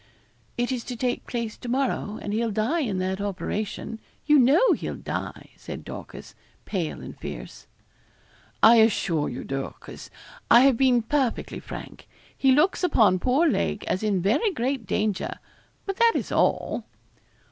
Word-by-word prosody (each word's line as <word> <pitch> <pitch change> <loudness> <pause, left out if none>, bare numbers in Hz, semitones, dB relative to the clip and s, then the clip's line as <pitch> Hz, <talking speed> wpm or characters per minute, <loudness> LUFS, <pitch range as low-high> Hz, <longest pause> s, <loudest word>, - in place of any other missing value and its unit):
'It 245 +1 0
is 250 -2 -2
to 250 - -6
take 245 +1 -2
place 235 -3 -3
to 245 - -8
morrow, 250 -5 -1
and 205 - -3
he'll 230 +1 0
die 220 +11 0
in 220 - -1
that 190 +1 -2
operation. 205 +2 -4 0.3
You 300 -1 +5
know 285 - +5
he'll - - -4
die,' - - -6
said - - -8
Dorcas, - - -9 0.3
pale 175 -6 -3
and - - -9
fierce. - - -9 1.0
'I 230 +2 +8
assure 195 -8 +2
you, 125 - -6
Dorcas, 135 0 -7 0.4
I 235 - +8
have 270 -1 +5
been 245 -2 +3
perfectly 265 -1 -1
frank. - - -9 0.3
He 270 - +3
looks 305 +9 +3
upon 215 - +4
poor 265 - +2
Lake 80 - -1
as 185 - -1
in 200 -5 0
very 235 - +2
great 260 - -2
danger 210 -1 -1 0.5
but 390 -1 -4
that 465 -1 +5
is - - -2
all.' - - +1
235 Hz, 155 wpm, -25 LUFS, 205-270 Hz, 1.0 s, I